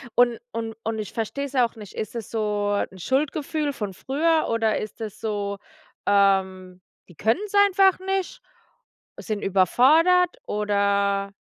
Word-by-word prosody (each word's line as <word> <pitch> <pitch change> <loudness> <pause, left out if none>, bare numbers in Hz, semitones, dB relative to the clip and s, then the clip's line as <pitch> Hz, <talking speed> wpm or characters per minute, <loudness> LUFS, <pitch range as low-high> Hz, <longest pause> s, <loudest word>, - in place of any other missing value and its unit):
Und 240 -2 +3
und 225 -1 -4
und 220 0 -3
ich 210 - -6
versteh's 275 +5 -4
auch 240 -2 +1
nicht, 210 -3 -11
ist 215 - -5
es 230 -3 -6
so 210 -2 -1 0.2
'n 190 - -13
Schuldgefühl 290 - -1
von 210 -7 -5
früher 315 - 0
oder 225 -1 +1
ist 215 +2 -6
es 220 -1 -7
so, 205 -2 -3 0.5
ähm: 190 -2 +1 0.3
„Die 175 - -17
können's 310 - -1
einfach 385 0 +4
nicht”, 385 -1 -3 0.8
sind 215 -2 -4
überfordert 310 - +4
oder 200 -1 0
220 Hz, 135 wpm, -24 LUFS, 200-280 Hz, 0.8 s, einfach